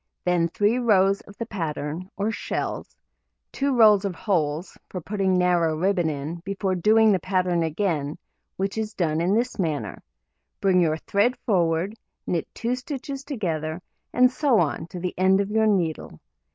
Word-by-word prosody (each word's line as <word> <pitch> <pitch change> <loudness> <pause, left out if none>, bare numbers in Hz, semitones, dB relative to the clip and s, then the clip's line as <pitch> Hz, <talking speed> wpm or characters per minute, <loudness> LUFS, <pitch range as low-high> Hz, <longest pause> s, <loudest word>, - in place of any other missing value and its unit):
Then 175 -2 +2
3 205 +8 +1
rows 195 -4 +3
of 200 - -14
the 230 - -3
pattern, 165 -2 -4
or 205 +2 0
shells, - - -4 0.5
2 275 -2 0
rows 210 -3 +6
of 195 -3 -2
holes 165 -4 -1
(for 185 - -5
putting 190 +1 0
narrow 175 -3 +2
ribbon 180 -1 +1
in) 150 +3 -4
before 190 +2 -2
doing 215 +4 +4
the 190 - +2
pattern 185 -1 0
again, 160 -3 -1 0.4
which 195 +3 -2
is 215 0 -4
done 160 -3 0
in 185 +4 +2
this 240 0 -1
manner: 145 - -2 0.6
bring 185 -2 +3
your 160 -2 +2
thread 205 +9 +1
forward, 175 -3 +1 0.3
knit 170 -3 -1
2 235 +2 -1
stitches 270 +1 -5
together, 170 - -3 0.3
and 250 0 +4
so 270 -4 +2
on 160 0 -1
to 180 - -8
the 180 0 -3
end 190 +1 +4
of 200 +1 -1
your 220 0 +3
needle. 170 - -1
185 Hz, 165 wpm, -24 LUFS, 165-215 Hz, 0.6 s, rows